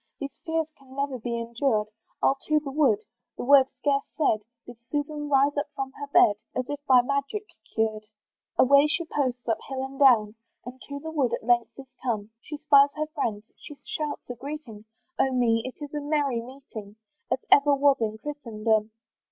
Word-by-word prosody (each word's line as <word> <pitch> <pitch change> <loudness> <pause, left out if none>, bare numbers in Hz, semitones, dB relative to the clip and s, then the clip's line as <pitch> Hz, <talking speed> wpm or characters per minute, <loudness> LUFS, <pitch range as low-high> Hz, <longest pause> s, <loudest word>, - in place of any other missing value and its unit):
"These 280 -1 -6
fears 320 0 0
can 265 -1 -16
never 275 -2 -2
be 235 +1 -3
endured, 230 -2 0 0.3
"I'll - - +5
to 305 0 +3
the 285 -2 -7
wood." 310 +9 +2 0.3
The - - -4
word 270 0 +7
scarce 280 -1 0 0.2
said, 250 -9 +2 0.2
Did 240 -1 -11
Susan 295 0 -3
rise 280 +1 +3
up 290 +1 -1
from 270 -1 -3
her 285 +1 -8
bed, 210 -7 +5 0.2
As 255 0 -2
if 290 0 -5
by 255 -2 +6
magic 280 - -2 0.3
cured. 215 -1 -1 0.5
Away 280 +3 +6
she 335 +2 -1
posts 255 -6 -2
up 225 -1 +1
hill 265 -1 -3
and 270 +1 -10
down, 230 -7 +5 0.3
And 250 +1 -9
to 280 0 -6
the 320 +2 -6
wood 280 -6 +1
at - - -10
length 240 0 +1
is 265 -2 -12
come, 220 -4 -2
She 300 +5 -7
spies 285 -2 +6
her 305 0 -1
friends, 215 -7 -2
she 295 - -11
shouts 300 -1 -4
a 245 - -4
greeting; 245 -4 -8 0.3
Oh 265 - +3
me! 235 -3 +2
it 260 - -7
is 290 -1 -8
a 295 - -2
merry 285 -5 0
meeting, 235 -5 -10 0.3
As 260 - -1
ever 285 0 +6
was 280 0 +4
in 220 -1 -1
Christendom. 220 -5 -1
270 Hz, 190 wpm, -26 LUFS, 235-290 Hz, 0.5 s, word